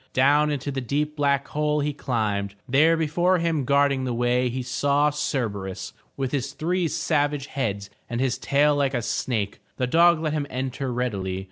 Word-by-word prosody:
Down 145 +3 +4
into 145 -1 -2
the 135 -1 -3
deep 150 +5 -1
black 140 -2 +1
hole 150 0 0
he 145 +1 -1
climbed. 105 -7 -2
There 155 +6 +4
before 175 +4 +2
him 165 -5 0
guarding 140 0 +2
the 125 -2 -2
way, 120 +1 +1
he 130 +1 -3
saw 145 +4 +1
Cerberus 105 -10 -3 0.2
with 135 -2 -2
his 140 -1 -2
three 175 +2 0
savage 145 -3 0
heads 100 -8 -3 0.2
and 120 -1 -3
his 130 -1 0
tail 145 +1 +3
like 140 -2 +1
a 120 - -1
snake. 105 -4 -2 0.2
The 125 - +1
dog 170 +5 +5
let 155 -2 -1
him 145 -2 -2
enter 130 +1 -3
readily. 100 -7 -2
140 Hz, 175 wpm, -24 LUFS, 125-150 Hz, 0.2 s, dog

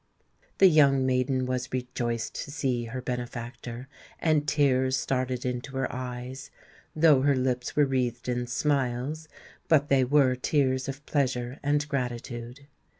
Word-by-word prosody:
The 195 - +6
young 140 -6 +5
maiden 130 0 +1
was 125 0 -3
rejoiced 120 -2 -3
to - - -11
see 130 -4 -1
her 125 +2 -6
benefactor; 120 0 -5 0.3
and 155 -2 +1
tears 130 -3 +2
started 130 -1 -2
into 125 +2 -4
her 135 - -2
eyes, 125 +1 -6 0.5
though 155 -4 +5
her 140 0 +3
lips 125 -1 -1
were 150 - +5
wreathed 125 -3 -1
in 125 0 -1
smiles;—but 145 +3 -1
they 135 -1 +4
were 135 0 +4
tears 130 0 0
of 135 +2 -7
pleasure 130 -3 -1
and 145 +1 +1
gratitude. 125 -1 -4
130 Hz, 135 wpm, -27 LUFS, 125-140 Hz, 0.5 s, The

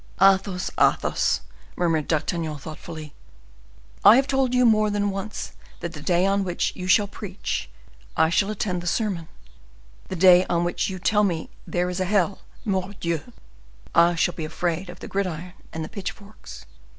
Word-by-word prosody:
"Athos! 195 -1 +3
Athos!" - - +2 0.3
murmured 165 -4 +1
D'Artagnan, 160 -1 -1
thoughtfully, 155 +1 -9 0.9
"I 205 +3 +9
have 265 +2 +4
told 265 -2 +1
you 250 0 +5
more 215 -2 +4
than 205 -1 0
once 195 +2 -5 0.3
that 170 -1 -5
the 150 - -8
day 175 +4 +2
on 195 0 +2
which 180 -2 -1
you 180 -1 -5
will 205 -2 -2
preach 200 -1 -5 0.5
I 160 0 +4
shall 195 +3 +2
attend 190 -4 -2
the 175 - -6
sermon; 180 -4 -1 0.8
the 190 - -4
day 180 0 +7
on 170 0 +2
which 175 +4 -1
you 190 - -4
will 185 - -10
tell 210 -1 +3
me 170 -5 -1 0.2
there 180 0 0
is 180 +1 -3
a 185 - +1
hell—Mordioux! 190 -1 -2 0.6
I 170 +1 +5
shall 175 +2 +1
be 160 - -6
afraid 175 +3 -2
of 175 - -10
the - - -7
gridiron 180 -3 -3 0.2
and 160 -1 -4
the - - -7
pitch 195 -2 -4
forks. 200 - -13
185 Hz, 170 wpm, -24 LUFS, 170-200 Hz, 0.9 s, I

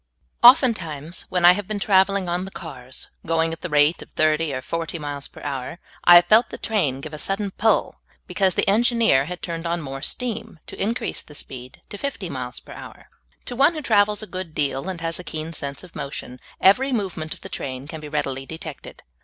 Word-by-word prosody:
OFTENTIMES, 185 - +4
when 180 -1 +2
I 175 - +11
have 190 +1 -2
been 215 - -2
traveling 195 -1 +3
on 175 +1 -1
the 190 - -6
cars, 130 -9 -8
going 165 0 +1
at 165 - -9
the 180 - -4
rate 150 +2 +3
of - - -11
thirty 155 0 +1
or 130 -1 -4
forty 165 0 -3
miles 145 -2 -5
per - - -14
hour, 135 +2 -4 0.3
I 175 - +9
have 175 0 +8
felt 220 +6 +5
the - - -7
train 150 - 0
give 155 +2 -8
a 150 - -5
sudden 195 +3 -1
pull, 220 +3 +1 0.2
be - - -9
cause 190 -3 +2
the - - +1
engineer 225 - +4
had 180 +3 -7
turned 170 -1 -4
on 170 +1 -1
more 135 -3 -6
steam 235 - -4
to - - -8
in 225 +4 +1
crease - - -2
the 150 - -14
speed 130 -3 -9
to 205 - -7
fifty 210 - -4
miles 125 -2 -5
per - - -12
hour. - - -11 0.4
To 245 - -5
one 280 +6 +4
who 310 - -3
travels 210 -2 +3
a - - -4
good 185 -5 -7
deal, 140 +3 -1
and 185 -3 -4
has 165 +1 -1
a - - -7
keen 160 0 -5
sense 140 -1 -5
of 180 - -14
motion, 125 -2 -6 0.2
every 255 +9 +5
movement 185 -9 -2
of - - -20
the - - -8
train 130 0 -5
can 160 0 -7
be 150 - -8
readily 135 -1 -2
detected. 160 -2 -9
170 Hz, 220 wpm, -23 LUFS, 145-200 Hz, 0.4 s, I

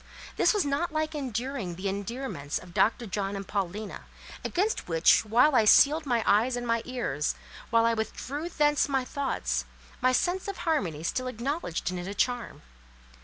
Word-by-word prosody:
This - - +4
was 415 -6 +1
not 285 +5 -1
like 310 0 -1
enduring 255 - -3
the 185 +3 -4
endearments 200 - -3
of 180 -1 -10
Dr. 230 +5 +2
John 200 -1 -3
and 195 -1 -6
Paulina, 200 +1 -4 0.4
against 405 +5 -1
which 165 0 +4
while 240 +7 +4
I 225 -4 +4
sealed 295 +7 +6
my 235 -3 +1
eyes 230 +5 +3
and 245 0 -4
my 230 -1 +1
ears, 230 - -2 0.3
while 230 0 +4
I 230 - +3
withdrew 270 +8 -4
thence 295 -2 +2
my 265 -2 0
thoughts, 65 - -2 0.4
my 255 +1 +4
sense 355 +10 0
of 395 - -4
harmony 180 - 0
still 255 +9 -1
acknowledged 250 - -3
in 180 - -4
it 175 - -6
a 200 - -5
charm. 245 0 -1
240 Hz, 170 wpm, -28 LUFS, 200-280 Hz, 0.4 s, sealed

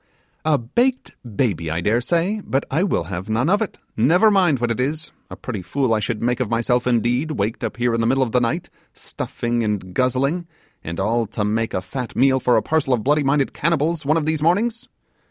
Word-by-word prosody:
'A 155 -2 +3
baked 245 - 0 0.2
baby, 95 -10 0
I 80 +2 -1
dare 110 +7 +1
say 175 - 0
I - - -7
but 135 +1 -1
I 155 +6 +1
will 195 - +1
have 90 +5 -6
none 120 +10 +1
of 205 +2 +3
it, 220 - -3 0.2
never 175 - +4
mind 180 -8 +3
what 120 -1 -1
it 115 - -2
is. 150 +5 -2 0.2
A - - -7
pretty 110 -7 -5
fool 120 +7 0
I 110 - +2
should 105 +1 -3
make 125 +1 +1
of 125 -5 -1
myself, 120 +2 +1
indeed, 125 +5 +1
waked 110 +1 -2
up 115 - -3
here 120 -1 +1
in 115 - +1
the 115 - +1
middle 135 +2 +3
of 120 - -3
the 125 - +3
night, 155 +9 -2 0.2
stuffing 120 0 -3
and 100 -4 -3
guzzling, 135 - 0 0.4
and 85 +1 -5
all 115 +3 +1
to 105 - -3
make 110 +2 -1
a 95 - -2
fat 125 +5 -6
meal 130 0 +4
for 125 -1 +3
a - - +1
parcel 150 -5 +1
of 110 - -5
booby 150 +2 +3
minded 140 0 +1
cannibals 165 0 0
one 150 +3 +2
of 155 - -1
these 155 -1 0
mornings! 225 +9 +1
125 Hz, 225 wpm, -21 LUFS, 115-155 Hz, 0.4 s, never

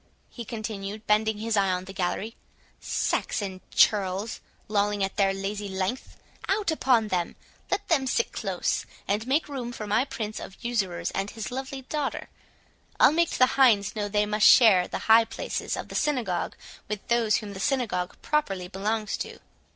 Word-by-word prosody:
he 240 - -7
continued, 215 -1 -6
bending 215 0 +2
his 220 +1 -1
eye 195 -2 +3
on 180 0 -2
the 190 - -9
gallery. 195 +4 -2 0.4
"Saxon 190 -3 -2
churls, 200 +1 +2 0.3
lolling 205 -1 +1
at 195 - -2
their 195 -1 +3
lazy 200 +1 -4
length!—out 255 - -3
upon 245 -8 +2
them!—let 185 - -4
them 275 -6 +2
sit 470 - +1
close, - - -1 0.2
and 210 +4 -1
make 290 +5 +2
room 260 -5 -5
for 220 -3 -6
my 215 +4 +2
prince 215 -5 -5
of 195 - -9
usurers 190 -8 -1
and 195 +1 -2
his 220 -2 -6
lovely 265 +1 -5
daughter. 290 +1 -3 0.7
I'll - - +7
make 335 +2 +2
the 255 - +4
hinds 240 -7 +3
know 210 -1 -1
they 210 0 +2
must 210 0 +4
share 200 -8 +7
the - - -4
high 225 +1 +7
places - - -4
of - - -6
the - - -8
synagogue 240 - -1 0.3
with 210 -1 -5
those 235 -3 +3
whom 210 -3 -3
the 190 - -8
synagogue 225 -7 -1
properly 195 -12 -1
belongs 210 +3 -2
to." - - -6
215 Hz, 165 wpm, -26 LUFS, 195-245 Hz, 0.7 s, I'll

